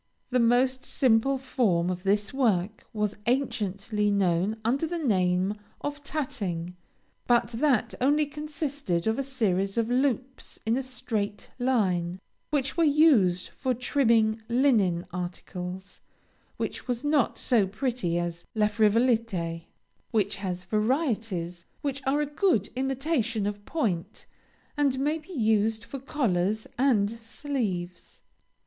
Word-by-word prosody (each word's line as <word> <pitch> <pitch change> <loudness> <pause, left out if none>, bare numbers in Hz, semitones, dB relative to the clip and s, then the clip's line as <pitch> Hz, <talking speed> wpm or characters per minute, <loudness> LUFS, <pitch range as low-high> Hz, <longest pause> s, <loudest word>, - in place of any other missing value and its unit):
The 250 - +3
most 255 +3 +3
simple 260 +1 +2
form 205 -10 +1
of 180 0 -4
this 205 +3 +1
work 215 -6 0
was 210 -3 -1
anciently 210 -4 0
known 195 +1 +1
under 275 +7 +1
the 345 +2 -3
name 190 - +1 0.3
of 290 0 -4
Tatting, 205 - -3 0.5
but 240 -1 +3
that 245 0 +1
only 295 +3 +3
consisted 290 - -3
of 220 +3 +1
a - - +1
series 200 -7 0
of 230 +1 +1
loops 260 0 -1
in 225 +1 +2
a 265 - 0
straight 235 -5 -4
line, 190 -8 +1 0.3
which 275 -3 0
were 335 - +3
used 280 - +4
for 255 -2 -2
trimming 230 -4 +2
linen 225 -9 +3
articles, 180 +1 -6
and - - -39
which - - -4
was 245 0 -2
not 290 -3 +2
so 220 -6 +2
pretty 210 -5 -1
as 170 -1 -3
La 215 -1 +3
Frivolité, 215 -6 +1 0.4
which 205 -3 0
has 185 -2 -4
varieties 215 - -1 0.2
which 280 -1 -2
are 285 +2 +2
a - - +1
good 295 - +1
imitation 260 -4 0
of 205 0 -3
point, 205 - -2 0.5
and 280 -3 +2
may 295 +4 0
be 315 +5 -15
used 220 -3 +2
for 275 - -7
collars 220 -7 0
and 235 -6 +3
sleeves. 225 - -5
225 Hz, 130 wpm, -27 LUFS, 195-270 Hz, 0.5 s, used